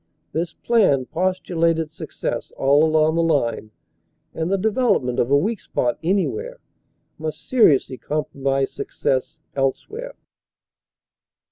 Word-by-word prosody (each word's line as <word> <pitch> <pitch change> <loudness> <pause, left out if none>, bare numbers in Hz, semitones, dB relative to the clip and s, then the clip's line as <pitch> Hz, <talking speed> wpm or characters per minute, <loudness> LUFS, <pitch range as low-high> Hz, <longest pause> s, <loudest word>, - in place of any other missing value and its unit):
This 170 +1 -2
plan 195 - +2
postulated 165 -2 0
success 160 - -5
all 140 +3 +4
along 155 0 +3
the 165 - +2
line 140 -9 0 0.6
and 165 +3 -2
the 195 - +3
development 205 - +1
of 120 - +1
a 140 - +5
weak 210 +8 0
spot 120 +3 -1
anywhere 310 - -1 0.6
must 155 -1 -6
seriously 145 - +3
compromise 135 -1 -1
success 150 +4 -2
else 135 -1 0
where. - - -7
160 Hz, 115 wpm, -22 LUFS, 140-190 Hz, 0.6 s, a